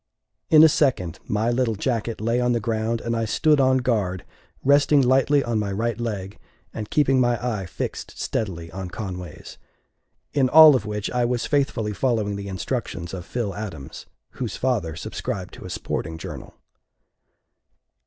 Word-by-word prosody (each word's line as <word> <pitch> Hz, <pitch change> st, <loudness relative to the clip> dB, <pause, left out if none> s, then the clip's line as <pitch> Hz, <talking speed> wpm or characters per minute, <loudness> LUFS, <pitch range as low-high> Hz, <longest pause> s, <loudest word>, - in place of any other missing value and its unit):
In 155 Hz, -3 st, +8 dB
a -, -, +10 dB
second 125 Hz, -, +1 dB
my 110 Hz, +3 st, 0 dB
little 120 Hz, -2 st, 0 dB
jacket 115 Hz, +1 st, -2 dB
lay 115 Hz, +3 st, 0 dB
on 125 Hz, 0 st, +2 dB
the 120 Hz, -, +1 dB
ground, 115 Hz, +1 st, -1 dB
and 115 Hz, 0 st, -2 dB
I 115 Hz, 0 st, 0 dB
stood 150 Hz, +6 st, +2 dB
on 130 Hz, -1 st, +4 dB
guard, 105 Hz, -8 st, -1 dB, 0.4 s
resting 145 Hz, +1 st, +5 dB
lightly 135 Hz, +3 st, +3 dB
on 115 Hz, -2 st, -1 dB
my 100 Hz, -1 st, -2 dB
right 115 Hz, +3 st, -2 dB
leg 100 Hz, -4 st, -4 dB, 0.3 s
and 105 Hz, -1 st, -6 dB
keeping 135 Hz, -3 st, +3 dB
my 120 Hz, -1 st, +2 dB, 0.2 s
eye 95 Hz, -, -6 dB
fixed 75 Hz, -, -6 dB
steadily 85 Hz, -6 st, -3 dB
on 95 Hz, +1 st, -6 dB
Conway's 90 Hz, -5 st, -7 dB, 0.7 s
in 135 Hz, -3 st, +2 dB
all 155 Hz, 0 st, +9 dB
of 110 Hz, -5 st, -2 dB
which 105 Hz, -1 st, -3 dB
I 125 Hz, -1 st, +1 dB
was 120 Hz, 0 st, -1 dB
faithfully 135 Hz, -7 st, 0 dB
following 110 Hz, -4 st, 0 dB
the 100 Hz, 0 st, -6 dB
instructions 95 Hz, -3 st, -4 dB
of 90 Hz, -2 st, -7 dB
Phil 115 Hz, -5 st, -3 dB
Adams, 90 Hz, -10 st, -7 dB, 0.2 s
whose -, -, -5 dB
father 105 Hz, -12 st, -1 dB
subscribed -, -, -5 dB
to -, -, -11 dB
a -, -, -7 dB
sporting 80 Hz, 0 st, -4 dB
journal. 80 Hz, -, -8 dB
115 Hz, 165 wpm, -23 LUFS, 100-130 Hz, 0.7 s, a